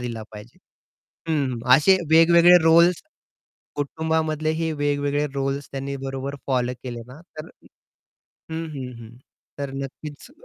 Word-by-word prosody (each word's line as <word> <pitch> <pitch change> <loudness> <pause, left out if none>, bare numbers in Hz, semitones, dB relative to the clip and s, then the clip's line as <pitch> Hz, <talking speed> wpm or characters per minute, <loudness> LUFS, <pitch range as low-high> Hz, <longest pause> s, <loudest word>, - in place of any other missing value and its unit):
दिला 120 -2 -5
पाहिजे. 105 +2 -12 0.7
हं, 140 -6 -1 0.2
असे 190 +7 +4
वेगवेगळे 170 +2 +7
रोल्स 170 +2 +4 0.7
कुटुंबामधले 155 +1 -1
हे 160 0 -2
वेगवेगळे 145 0 -1
रोल्स 135 0 -3
त्यांनी 140 0 -5
बरोबर 135 +1 -5
फॉलो 125 -2 0
केले 120 -2 -6
ना, 130 +5 -13 0.2
तर 155 - -7 1.0
हं, 160 +1 -4
हं, 130 -2 -6
हं. 115 +1 -13 0.4
तर 140 -1 -4
नक्कीच 140 - -8
145 Hz, 120 wpm, -23 LUFS, 135-160 Hz, 1.0 s, वेगवेगळे